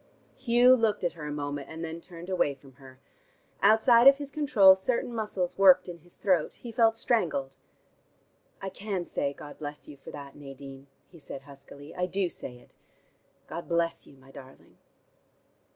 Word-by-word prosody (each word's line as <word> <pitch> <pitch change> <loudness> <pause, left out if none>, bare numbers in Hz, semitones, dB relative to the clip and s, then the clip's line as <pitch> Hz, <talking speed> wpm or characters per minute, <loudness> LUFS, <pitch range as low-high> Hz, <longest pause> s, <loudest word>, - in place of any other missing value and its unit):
Hugh 250 0 +5
looked 225 -5 0
at 175 - 0
her 150 -3 -8
a - - -4
moment, 145 -1 -4
and 160 +1 -6
then 165 +1 -7
turned 170 0 -11
away 180 -7 0
from 135 0 -18
her. 130 -1 -15 0.6
Outside 230 +4 +6
of 275 0 +8
his 285 -1 -7
control 270 -11 +6
certain 235 +5 -2
muscles 205 -5 -3
worked 185 -2 +6
in 175 -1 -8
his 175 +2 -12
throat; 180 -6 +1
he 240 - -9
felt 225 0 +3
strangled. 170 - -1 1.1
"I 195 - -3
can 190 -2 -4
say 140 - -2
'God 145 +1 -12
bless 145 -1 -8
you' 145 - -11
for 135 - -12
that, 140 -1 -10
Nadine," 135 -1 -11 0.2
he 170 - -15
said 140 -2 -9
huskily. 140 +1 -13
"I 180 0 -2
do 185 -1 -1
say 125 - -8
it. - - -22 0.7
God 170 - -8
bless 170 0 0
you, 140 - -17
my 135 0 -18
darling." 135 0 -15
170 Hz, 175 wpm, -28 LUFS, 145-210 Hz, 1.1 s, of